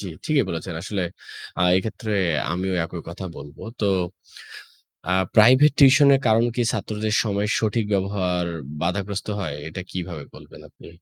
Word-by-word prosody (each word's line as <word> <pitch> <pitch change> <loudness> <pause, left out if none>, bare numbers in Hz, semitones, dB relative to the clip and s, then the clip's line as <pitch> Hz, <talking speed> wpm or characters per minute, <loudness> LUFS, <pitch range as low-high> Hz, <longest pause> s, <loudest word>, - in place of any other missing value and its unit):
জ্বী, 100 - -6 0.2
ঠিকই 150 -3 +2
বলেছেন। 85 +2 -5
আসলে 100 -1 -3 0.6
আ - - +2
এক্ষেত্রে 110 +3 -3 0.4
আমিও 95 +2 -2
একই 85 +1 -7
কথা 85 +3 -7
বলবো। 75 +1 -11 0.2
তো - - +1 1.2
আ - - +1 0.2
প্রাইভেট 130 +7 +7
টিউশনের 140 0 +7
কারণ 115 +1 +4
কি 120 - +1
ছাত্রদের 110 0 -2
সময়ের 105 0 -1
সঠিক 110 0 0
ব্যবহার 95 -2 0 0.4
বাধাগ্রস্ত 100 +4 -2
হয় 80 -7 -3
এটা 85 +4 -7
কীভাবে 85 -5 -6
বলবেন - - -14
আপনি? - - -16
100 Hz, 140 wpm, -23 LUFS, 90-110 Hz, 1.2 s, প্রাইভেট